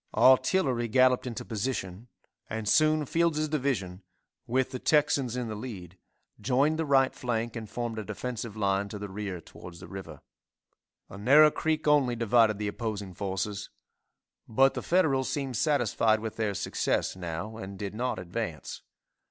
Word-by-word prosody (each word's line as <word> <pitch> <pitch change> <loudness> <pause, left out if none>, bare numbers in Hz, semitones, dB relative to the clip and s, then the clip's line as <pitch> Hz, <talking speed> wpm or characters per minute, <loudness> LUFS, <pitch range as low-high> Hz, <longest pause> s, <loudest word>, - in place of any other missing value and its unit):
Artillery 130 -2 +4
galloped 130 +2 +3
into 120 0 -5
position, 110 -2 -4 0.4
and 110 0 -4
soon 155 +4 +3
Fields' 160 0 +1
division, 125 - -2 0.5
with 130 +2 0
the 130 - -4
Texans 140 -5 +2
in 125 -2 -2
the 110 - -4
lead, 105 -6 -8 0.4
joined 140 +8 +1
the 160 - -1
right 135 -2 +4
flank 120 -1 -3
and 110 -3 -6
formed 120 -2 -4
a - - -4
defensive 115 0 -5
line 100 -1 0
to 105 - -6
the 100 0 -6
rear 95 -2 -5
towards 85 +1 -12
the 90 - -10
river. 95 -1 -9 0.9
A 100 - -10
narrow 150 +8 +7
creek 155 0 -1
only 140 -5 +4
divided 115 -2 +3
the 105 0 -3
opposing 105 -3 -4
forces, 100 +2 -3 0.8
but 135 +4 +4
the - - -4
Federals 145 -8 +2
seemed 135 -3 -3
satisfied 115 -6 +2
with 110 0 -5
their 105 -3 -1
success - - -1
now 95 +4 -5
and 95 -2 -7
did 100 0 -5
not 125 +4 -2
advance. 90 -2 -5
115 Hz, 155 wpm, -28 LUFS, 100-130 Hz, 0.9 s, narrow